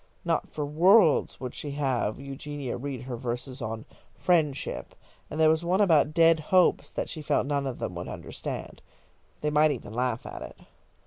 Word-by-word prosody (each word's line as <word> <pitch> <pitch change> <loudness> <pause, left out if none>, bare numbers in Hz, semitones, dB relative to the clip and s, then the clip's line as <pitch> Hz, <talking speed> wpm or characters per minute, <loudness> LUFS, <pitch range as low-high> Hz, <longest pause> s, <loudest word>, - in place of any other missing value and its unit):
Not - - 0
for 150 - -3
worlds 170 +3 +4
would 130 -2 -5
she 145 - -6
have 130 -6 -1
Eugenia 140 0 -5
read 130 -1 -5
her 125 -1 -5
verses 125 +3 -5
on 110 0 -4 0.3
"Friendship," 155 -6 0 0.3
and 155 - -5
there 160 - +6
was 160 +1 +3
one 180 +3 +1
about 160 -7 +4
"Dead 165 -1 +6
Hopes" 180 +4 +3
that - - -3
she 155 - -6
felt 150 - +1
none 140 -1 -1
of 130 - -4
them - - -4
would 85 0 -6
understand. - - -6 0.6
They 150 - 0
might 150 +1 +5
even 120 -7 -5
laugh 125 0 -1
at - - -7
it. - - -9
145 Hz, 180 wpm, -27 LUFS, 125-155 Hz, 0.6 s, there